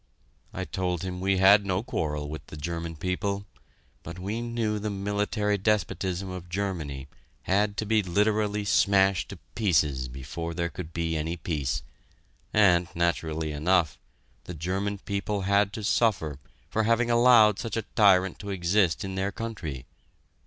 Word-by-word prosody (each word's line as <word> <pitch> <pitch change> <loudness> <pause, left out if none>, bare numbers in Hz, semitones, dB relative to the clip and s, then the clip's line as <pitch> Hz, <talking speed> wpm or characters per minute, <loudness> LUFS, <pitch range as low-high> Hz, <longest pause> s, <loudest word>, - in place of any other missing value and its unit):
I - - -4
told 90 -2 -2
him 90 -1 -4
we 95 0 +2
had 100 +2 +6
no 95 +1 -1
quarrel 75 - -2
with 75 +1 -8
the 75 - -9
German 85 +2 -4
people, 100 +4 -2 0.6
but 85 +1 -8
we 100 +5 -3
knew 115 -3 -1
the 105 +1 -3
military 105 +1 -1
despotism 95 -2 0
of 90 -2 -7
Germany 85 -8 -3 0.4
had 100 +2 +1
to 110 - -1
be 110 0 +3
literally 105 +2 +1
smashed 95 -2 +3
to - - -8 0.2
pieces 75 - +1
before 70 +7 -6
there 85 0 -1
could 85 -2 -8
be 80 0 -2
any 80 +2 -2
peace, 75 -6 -2 0.7
and, 90 -5 +4
naturally 80 -2 -1
enough, 80 +2 +1 0.5
the 90 - -7
German 95 +6 -2
people 100 +1 -3
had 100 +1 +2
to 110 - -5
suffer 85 - +1 0.3
for 110 - 0
having 115 +1 +2
allowed 120 -3 +6
such 115 -2 -3
a 115 - -1
tyrant 95 -3 +4
to 100 - -7
exist 95 0 +1
in 95 - -5
their 95 +1 -1
country. 95 - -6
95 Hz, 150 wpm, -27 LUFS, 85-105 Hz, 0.7 s, had